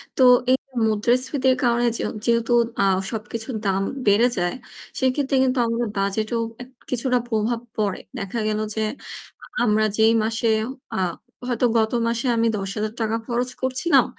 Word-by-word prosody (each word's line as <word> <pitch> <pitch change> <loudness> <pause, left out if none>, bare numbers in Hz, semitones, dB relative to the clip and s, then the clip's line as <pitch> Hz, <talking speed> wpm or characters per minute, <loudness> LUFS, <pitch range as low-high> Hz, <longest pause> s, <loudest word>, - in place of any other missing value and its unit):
তো - - 0 0.3
এই 260 - +5 0.3
মুদ্রাস্ফীতির 255 +5 +2
কারণে 240 0 +2
যে - - -4 0.2
যেহেতু 235 0 +1 0.3
আ - - +4 0.3
সবকিছুর 225 +2 -5
দাম 195 0 +1 0.3
বেড়ে 205 +4 +5
যায়, 175 -1 0 0.4
সেক্ষেত্রে 265 +1 +1
কিন্তু 255 0 +1
আমাদের 230 +1 -1
বাজেটেও 215 +4 0 0.2
এক 245 - -10 0.2
কিছুটা 250 0 +1
প্রভাব 225 0 0 0.2
পড়ে। 205 -3 0 0.2
দেখা 200 +3 -4
গেল 215 0 0 0.2
যে 220 - -1 0.8
আমরা 215 -1 +3
যেই 220 +1 +5
মাসে 225 +1 -1 0.5
আ - - -2 0.5
হয়তো 245 0 +1
গত 220 -1 +2 0.2
মাসে 235 +2 -1
আমি 230 0 +3
৳১০,০০০ 215 +3 -2
খরচ 245 0 -1
করছিলাম, 260 +1 +3
230 Hz, 140 wpm, -23 LUFS, 215-250 Hz, 0.8 s, এই